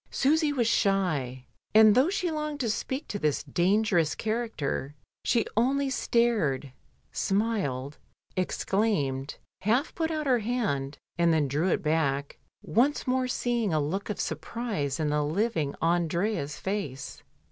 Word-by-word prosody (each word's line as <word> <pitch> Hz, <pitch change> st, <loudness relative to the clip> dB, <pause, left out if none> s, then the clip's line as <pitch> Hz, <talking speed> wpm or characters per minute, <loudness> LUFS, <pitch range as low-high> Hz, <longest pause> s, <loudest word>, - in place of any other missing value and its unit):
Susy 305 Hz, +2 st, +2 dB
was 255 Hz, -5 st, +1 dB
shy, 155 Hz, -, +1 dB, 0.3 s
and 215 Hz, -1 st, +8 dB
though 260 Hz, +9 st, +4 dB
she 365 Hz, -3 st, -1 dB
longed 305 Hz, -1 st, -3 dB
to 230 Hz, -4 st, +1 dB
speak 265 Hz, +6 st, -3 dB
to 205 Hz, -, -4 dB
this 150 Hz, -4 st, 0 dB
dangerous 175 Hz, +2 st, +2 dB
character 215 Hz, -, -2 dB, 0.3 s
she 230 Hz, -2 st, +2 dB
only 270 Hz, +4 st, +2 dB
stared, 210 Hz, -, +1 dB, 0.4 s
smiled, 190 Hz, -, -1 dB, 0.4 s
exclaimed, 180 Hz, -8 st, 0 dB, 0.3 s
half 240 Hz, +9 st, +1 dB
put 320 Hz, -1 st, -1 dB
out 310 Hz, -2 st, -2 dB
her 255 Hz, -3 st, +3 dB
hand, 205 Hz, -, -1 dB, 0.2 s
and 170 Hz, -1 st, +4 dB
then 155 Hz, -3 st, +2 dB
drew 150 Hz, +6 st, 0 dB
it -, -, 0 dB
back 145 Hz, -3 st, 0 dB, 0.2 s
once 270 Hz, +7 st, +2 dB
more 255 Hz, 0 st, +1 dB
seeing 240 Hz, -7 st, 0 dB
a -, -, +3 dB
look 175 Hz, +9 st, -2 dB
of 210 Hz, -, -3 dB
surprise 205 Hz, -, -3 dB
in 155 Hz, -1 st, +1 dB
the 150 Hz, 0 st, +1 dB
living 160 Hz, -2 st, 0 dB
Andrea's 170 Hz, -1 st, 0 dB
face. 175 Hz, -10 st, -4 dB
200 Hz, 135 wpm, -28 LUFS, 150-240 Hz, 0.4 s, and